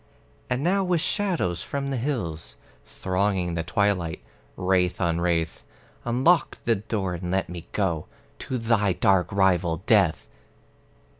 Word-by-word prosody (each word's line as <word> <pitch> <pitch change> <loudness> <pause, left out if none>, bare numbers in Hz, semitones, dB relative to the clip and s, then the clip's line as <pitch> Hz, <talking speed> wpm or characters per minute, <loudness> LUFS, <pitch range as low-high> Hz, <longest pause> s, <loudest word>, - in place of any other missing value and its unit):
And 125 +2 -1
now, 195 +4 +2
with 180 -2 +1
shadows 175 - 0
from 140 -1 -3
the 135 - -1
hills 85 - -3 0.3
Thronging 95 -2 -1
the 85 - -1
twilight, 90 -2 0 0.3
wraith 90 -1 +1
on 85 -2 0
wraith, 85 -2 0 0.4
Unlock 130 +7 +2
the 115 - +4
door 100 -3 -2
and 90 0 -5
let 95 +1 0
me 85 -1 -7
go 85 -7 -1 0.3
To 130 - -3
thy 110 -4 +2
dark 95 +2 +2
rival 90 -4 +2
Death! 100 -8 +3
95 Hz, 135 wpm, -25 LUFS, 85-120 Hz, 0.4 s, the